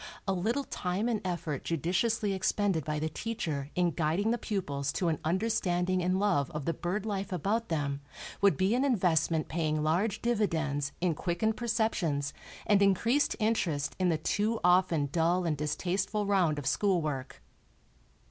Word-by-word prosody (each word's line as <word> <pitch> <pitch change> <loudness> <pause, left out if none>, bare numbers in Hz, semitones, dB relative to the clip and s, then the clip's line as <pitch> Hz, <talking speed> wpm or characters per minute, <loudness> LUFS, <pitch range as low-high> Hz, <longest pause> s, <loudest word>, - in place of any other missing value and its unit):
A 195 - +2
little 225 +10 0
time 195 -2 -2
and 230 -3 0
effort 170 -6 -3
judiciously 195 - 0
expended 190 -3 0
by 150 +1 -2
the 155 +1 -1
teacher 160 -7 -3
in 175 -1 +2
guiding 170 +7 0
the 240 - 0
pupils 140 -11 -2
to 175 - 0
an 155 - -1
understanding 185 0 +1
and 185 +1 +1
love 185 -9 +2
of 150 -2 -3
the 165 - 0
bird 185 +6 -3
life 200 -3 -3
about 205 +6 -1
them 145 -3 -1 0.4
would 200 -1 +4
be 190 +3 +2
an 255 +2 +2
investment 170 - +2
paying 155 -2 -1
large 190 +8 +1
dividends 160 -11 0
in 175 -2 +2
quickened 175 +7 -1
perceptions 185 -12 0 0.3
and 205 -1 +4
increased 225 +8 +3
interest 185 - 0
in 185 -1 +2
the 165 - +2
too 210 +8 0
often 180 -4 +3
dull 175 +3 +2
and 160 -3 +1
distasteful 185 +8 -1
round 185 -7 +2
of 145 - -5
school 190 +6 +2
work. 135 - -4
180 Hz, 160 wpm, -30 LUFS, 155-205 Hz, 0.4 s, would